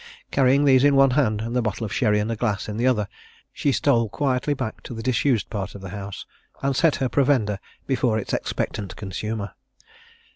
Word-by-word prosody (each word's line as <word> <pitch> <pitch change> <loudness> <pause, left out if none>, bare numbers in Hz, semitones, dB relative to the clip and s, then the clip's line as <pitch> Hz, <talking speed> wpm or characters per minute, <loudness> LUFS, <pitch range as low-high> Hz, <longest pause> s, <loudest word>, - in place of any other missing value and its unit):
Carrying 135 +1 +4
these 130 -2 +5
in 145 -1 +5
one 135 -1 +6
hand, 125 -6 +1
and 115 +2 -4
the 125 - +3
bottle 110 0 -2
of 100 - -5
sherry 105 -3 +2
and 105 +2 -1
a - - -1
glass 105 -3 -1
in 105 - -4
the 120 +2 +2
other, 105 -5 +2 0.5
she 140 - +1
stole 120 -6 +2
quietly 135 +3 0
back 130 -5 -5
to 120 - -8
the 115 - -6
disused 130 -1 +1
part 105 -2 -4
of 100 - -9
the 95 - -7
house, 100 0 -7 0.4
and 135 0 +1
set 165 +2 +3
her 130 - 0
provender 125 -7 +2 0.3
before 125 -4 +1
its 110 - -4
expectant 100 -4 -3
consumer. 105 +1 -4
115 Hz, 205 wpm, -24 LUFS, 105-135 Hz, 0.5 s, one